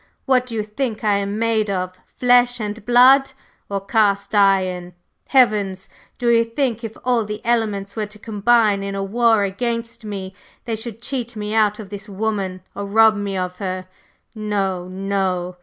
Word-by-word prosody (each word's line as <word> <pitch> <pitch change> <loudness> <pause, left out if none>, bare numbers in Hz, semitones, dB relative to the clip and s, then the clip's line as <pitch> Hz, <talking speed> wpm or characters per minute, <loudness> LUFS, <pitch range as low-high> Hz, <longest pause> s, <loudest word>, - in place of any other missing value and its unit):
What 255 -2 +2
do 230 - -5
you 215 - -1
think 220 +1 -4
I 205 -2 +3
am 200 +1 -2
made 220 -2 +1
of? 185 -1 -2 0.2
Flesh 245 0 +4
and 210 0 -5
blood, 260 +3 +6 0.4
or 200 -1 -1
cast 200 -2 +1
iron? 185 -3 +2 0.3
Heavens! 205 -7 +2 0.3
Do 240 -1 0
you 230 -1 +5
think 235 0 -2
if 225 -1 -6
all 245 -2 +2
the 210 0 -5
elements 215 -4 0
were 215 -2 -2
to 210 +1 -14
combine 215 -1 +2
in 195 0 -4
a 195 - -2
war 225 +1 +3
against 230 +3 -3
me, 195 -3 -6 0.3
they 230 -2 -2
should 225 +1 -7
cheat 245 -3 -3
me 210 0 -4
out 210 -1 +3
of 210 -3 -10
this 205 +1 -7
woman 195 -2 -2
or 200 - -5
rob 220 +1 +5
me 200 -1 -3
of 180 0 -3
her? 185 -1 -4 0.5
No, 200 -4 -2
no! 185 -1 -2
210 Hz, 175 wpm, -21 LUFS, 195-230 Hz, 0.5 s, blood